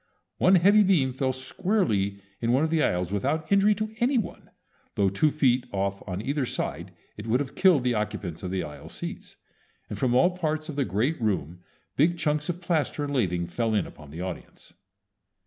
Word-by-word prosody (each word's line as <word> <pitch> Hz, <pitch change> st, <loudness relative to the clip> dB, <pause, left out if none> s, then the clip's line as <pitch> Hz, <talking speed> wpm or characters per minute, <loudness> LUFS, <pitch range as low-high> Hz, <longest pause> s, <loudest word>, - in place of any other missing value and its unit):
One 185 Hz, +1 st, +5 dB
heavy 200 Hz, +4 st, +6 dB
beam 165 Hz, -10 st, +3 dB
fell 130 Hz, 0 st, 0 dB
squarely 130 Hz, -, -1 dB, 0.2 s
in 115 Hz, 0 st, +1 dB
one 130 Hz, +4 st, +3 dB
of 160 Hz, -, 0 dB
the 165 Hz, -2 st, +2 dB
aisles 90 Hz, -, 0 dB
without 155 Hz, -, -1 dB
injury 200 Hz, +1 st, +5 dB
to 215 Hz, +1 st, -4 dB
any 255 Hz, +2 st, +2 dB
one, 225 Hz, -, -4 dB, 0.5 s
though 100 Hz, -1 st, +3 dB
two 100 Hz, +11 st, +2 dB
feet 130 Hz, -4 st, +2 dB
off 100 Hz, 0 st, -2 dB
on 95 Hz, +2 st, -4 dB
either 140 Hz, +3 st, -1 dB
side 90 Hz, -, -3 dB, 0.3 s
it 105 Hz, +2 st, -7 dB
would 120 Hz, +3 st, +2 dB
have 140 Hz, -2 st, -4 dB
killed 180 Hz, -9 st, +4 dB
the 125 Hz, -1 st, +1 dB
occupants 105 Hz, -6 st, -3 dB
of 90 Hz, -, -4 dB
the 95 Hz, 0 st, -2 dB
aisle 75 Hz, -1 st, -9 dB
seats, -, -, -7 dB, 0.6 s
and -, -, -5 dB
from 125 Hz, -2 st, +2 dB
all 175 Hz, +8 st, +4 dB
parts 155 Hz, -2 st, -2 dB
of 150 Hz, -, -5 dB
the 140 Hz, -2 st, +1 dB
great 120 Hz, -, -1 dB
room 90 Hz, -6 st, -1 dB, 0.4 s
big 170 Hz, +5 st, +3 dB
chunks 150 Hz, -1 st, 0 dB
of 175 Hz, +1 st, -3 dB
plaster 160 Hz, -4 st, -1 dB
and 145 Hz, 0 st, -3 dB
lathing 90 Hz, -9 st, 0 dB
fell 110 Hz, +5 st, -1 dB
in 105 Hz, -, +1 dB
upon 75 Hz, -2 st, -13 dB
the 80 Hz, +4 st, -7 dB
audience. 90 Hz, -1 st, -8 dB
130 Hz, 200 wpm, -26 LUFS, 100-160 Hz, 0.6 s, heavy